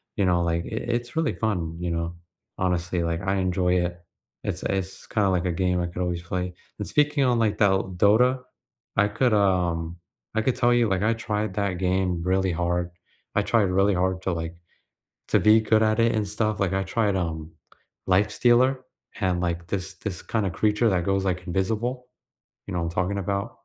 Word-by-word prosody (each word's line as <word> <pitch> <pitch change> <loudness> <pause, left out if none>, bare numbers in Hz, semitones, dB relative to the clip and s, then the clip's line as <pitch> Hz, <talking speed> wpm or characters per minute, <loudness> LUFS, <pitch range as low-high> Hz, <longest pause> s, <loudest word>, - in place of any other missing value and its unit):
you 100 - +1
know, 90 -1 +2
like, 85 0 -1
i - - -7
it's 120 +2 -3
really 160 -2 +1
fun, 85 -7 -2
you 90 -1 -2
know? 85 +1 -2 0.5
Honestly, 90 -1 0
like, 85 +1 -1
I 95 0 0
enjoy 90 -1 +1
it. 85 0 -5 0.4
It's - - -3
it's 95 -1 -3
kinda 100 -3 +1
like 90 -1 0
a 90 - +1
game 90 +1 0
I 85 - -1
could 90 +1 -5
always 90 -1 -2
play, 90 +1 -3 0.3
and - - -4
speaking 150 -1 +2
on, 125 -2 +2
like, 110 -2 +1
Dol 95 -2 +2
Dota, 125 +7 +4 0.5
I 100 +1 +4
could, 120 +2 +1
um, 90 -4 +1 0.4
I 110 - +2
could 125 +2 +1
tell 120 0 +3
you, 120 -2 +3
like, 95 +1 0
I 115 +1 +3
tried 110 -2 -2
that 100 -2 0
game 90 -2 0
really 95 0 +1
hard. 85 +1 -1 0.4
I - - +4
tried 115 -3 +3
really 100 +2 +3
hard 95 +1 0
to, 95 - 0
like 85 +1 -4 0.7
to - - +4
be 110 +1 +5
good 110 0 +3
at 110 +1 +2
it 115 0 +3
and 105 -2 0
stuff, 105 0 -1
like, 95 -1 0
I 95 0 +1
tried, 100 0 0
um, 80 -3 -3 0.6
Lifestealer, 120 +7 +3 0.4
and, 90 -2 +1
like, 85 -1 -2
this 95 -1 -3
this 90 -2 -6
kinda 100 -5 -1
creature 105 +4 +2
that 90 -3 0
goes, 95 0 +1
like, 90 -1 -2
invisible, 115 +8 -1 0.6
you - - -5
know 90 - -1
what - - -1
I'm 85 - -3
talking 95 +4 -1
about? 100 +1 -2
95 Hz, 200 wpm, -25 LUFS, 90-110 Hz, 0.7 s, be